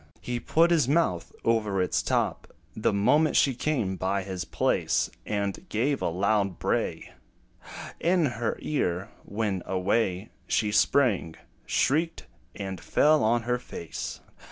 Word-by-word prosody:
He 120 -1 -3
put 165 +7 +3
his 160 -7 +3
mouth 145 - +1
over 110 -4 +1
its 90 - +1
top, - - -1 0.2
The - - +1
moment 130 +10 +3
she 135 - +4
came 120 -8 -1
by 95 +2 -1
his 95 -2 -5
place; - - 0 0.2
And 100 -2 -3
gave 130 +6 0
a - - +1
loud 100 +1 +1
bray - - -2 0.9
In 175 -1 +2
her 120 -4 -2
ear, 95 - -1
when, 100 -3 -2
away 95 +1 0 0.2
She 105 -2 +1
sprang, 105 - +2 0.3
shrieked, 160 +5 +1 0.3
and 95 -3 -5
fell 155 -4 +3
on 115 +2 +2
her 125 +1 0
face. 85 -8 -7
110 Hz, 130 wpm, -27 LUFS, 95-135 Hz, 0.9 s, she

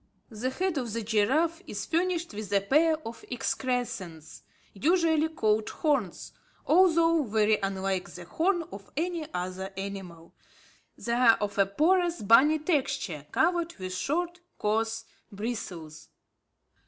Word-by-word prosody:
The 225 +4 -2
head 360 +3 -1
of 235 -5 -4
the 230 0 -2
giraffe 270 - +1
is 205 - -4
furnished 340 -3 -1
with 205 -1 -6
a 200 - +4
pair 310 +10 +3
of 230 - -9
excrescences, 240 - -3 0.3
usually 320 - +2
called 220 -8 +1
horns, 275 - -1 0.3
although 335 -1 +4
very 215 -3 +2
unlike 195 -1 -2
the 175 - -10
horn 345 - 0
of 195 0 -10
any 330 -1 -2
other 185 +2 -4
animal. 190 -4 -7 0.6
They 235 - -3
are 235 -2 +6
of 205 -1 -3
a 195 - +5
porous 345 - +2
bony 265 +9 +6
texture 270 - -1
covered 345 +6 +1
with 185 -1 -5
short, 345 - -2 0.2
coarse 225 +1 -1 0.3
bristles. 190 -8 -6
230 Hz, 130 wpm, -28 LUFS, 200-320 Hz, 0.6 s, are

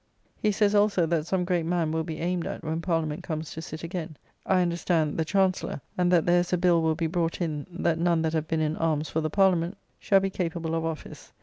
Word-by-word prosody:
] - - -40
He 210 - +3
says, 205 0 +2
also, 205 -4 +3
that 165 -1 -1
some 185 -1 0
great 175 -2 +1
man 170 -2 0
will 160 0 0
be 160 -1 -5
aimed 175 0 -1
at - - -6
when 160 +1 -2
Parliament 165 -3 -1
comes 155 -2 -4
to 160 - -6
sit 155 0 -8
again; 165 -3 -5 0.3
I 185 -1 +4
understand, 170 -3 0
the - - +3
Chancellor: 190 -3 +1 0.2
and 180 -1 +2
that 170 -3 +4
there 175 0 +4
is 175 - -2
a 180 - +3
bill 175 -1 +3
will 160 -1 +1
be 165 - -1
brought 165 0 -1
in, 155 -3 -3
that 170 -2 -1
none 170 -1 +2
that 160 0 0
have 160 -1 -1
been 160 0 0
in 155 +1 0
arms 155 -2 0
for 160 - -1
the 155 - -1
Parliament 185 0 +2 0.2
shall 195 - +4
be 195 0 -1
capable 170 -3 -3
of 165 0 0
office. 160 -1 -7
170 Hz, 245 wpm, -27 LUFS, 160-180 Hz, 0.3 s, I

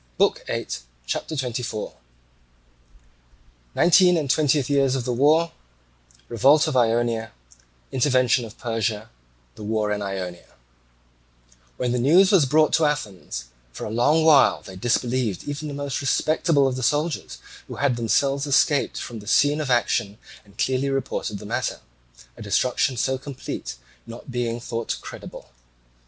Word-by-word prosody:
BOOK - - +2
VIII - - -3 0.4
CHAPTER 155 - -3
XXIV 125 -5 -4 1.8
Nineteenth 180 0 +5
and 150 -3 -1
Twentieth 145 -3 +2
Years 140 -2 +2
of 125 -3 -3
the 125 - -1
War—Revolt 105 - 0
of - - -2
Ionia— 115 -2 +1 0.6
Intervention 130 -1 +2
of 115 0 -10
Persia—The 105 - -5
War 105 0 -1
in 105 0 -2
Ionia 95 -3 -6 1.2
When 125 -1 -1
the 125 - 0
news 175 - +5
was 175 -9 +4
brought 155 +3 +3
to 160 - +3
Athens, 105 - -4 0.3
for - - -7
a 105 - -5
long 150 +8 +2
while 150 -4 +5
they 95 - -11
disbelieved 120 -1 -1
even 145 +1 -5
the 145 - -6
most 140 -2 -3
respectable 155 +1 +2
of 130 -1 0
the 130 - -4
soldiers 150 +5 -1 0.3
who - - -7
had 140 -3 +1
themselves 135 +5 0
escaped 145 +1 +2
from 115 -2 -6
the 105 - -13
scene 145 +6 +3
of 145 - -4
action 115 -4 +1 0.3
and 100 -1 -22
clearly 130 +1 0
reported 135 -5 -3
the 105 - -10
matter, - - -2 0.6
a - - -13
destruction 125 0 0
so 130 +2 0
complete 135 -1 -7 0.3
not 115 +3 -10
being 120 -1 -2
thought 115 -1 -4
credible. - - -10
125 Hz, 140 wpm, -23 LUFS, 110-145 Hz, 1.8 s, Nineteenth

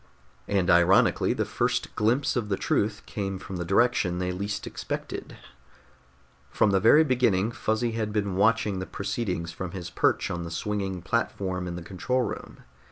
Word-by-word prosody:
And, 95 -3 +1
ironically, 85 +2 +4
the - - -1
first - - -1
glimpse 115 +6 +1
of 115 -4 -1
the 95 - 0
truth 105 0 0
came 95 -2 -3
from 95 0 -7
the 85 - -2
direction 95 -1 +2
they 90 0 -1
least 100 +3 -3
expected. - - -6 1.1
From 105 - +2
the 95 - +3
very 115 +10 +6
beginning 120 -7 +2
Fuzzy 115 -1 -1
had 110 -2 -2
been 100 -3 -1
watching 105 -1 +2
the 95 - -5
proceedings 100 -4 -3
from 90 +1 -6
his 90 -3 -6
perch - - +1
on 85 - -3
the 85 - -5
swinging 95 0 -3
platform 95 -5 -1
in 85 - -4
the 90 - -6
control 125 +9 -1
room. - - -7
100 Hz, 165 wpm, -27 LUFS, 90-110 Hz, 1.1 s, very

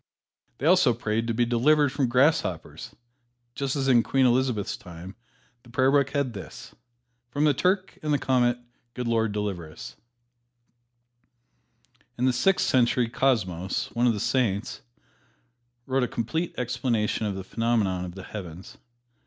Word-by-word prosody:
They 135 - -5
also 165 -8 +5
prayed 115 0 -2
to 115 - 0
be 120 +1 +2
delivered 140 +5 +3
from 135 -3 0
grasshoppers, 125 - 0 0.6
just 140 +1 -2
as 135 -2 -1
in 125 -3 +5
Queen 135 +2 +2
Elizabeth's 125 -4 +1
time 90 +2 -11 0.5
the 120 - -19
Prayer 130 +3 +2
Book 140 -1 +3
had 140 -4 -1
this, 100 - -10 0.6
"From 145 +5 -1
the 150 -1 +4
Turk 185 +7 0
and 150 - -2
the 145 - +3
Comet, 125 -3 +2 0.4
good 125 -1 -3
Lord 115 -2 +1
deliver 100 -6 -4
us." - - -10 2.2
In 125 - 0
the 130 - +3
Sixth 185 +10 +2
Century, 120 -1 +2
Cosmos, 105 -8 -1
one 120 +1 +1
of 120 - +3
the 105 - -4
Saints, 105 -4 -1 1.0
wrote 135 0 0
a 125 - +1
complete 135 +7 -3
explanation 120 -3 -1
of 100 - -3
the 95 - -5
phenomena 105 -4 0
of 90 -1 -7
the 95 - -8
heavens. 90 -3 -9
120 Hz, 150 wpm, -26 LUFS, 105-135 Hz, 2.2 s, also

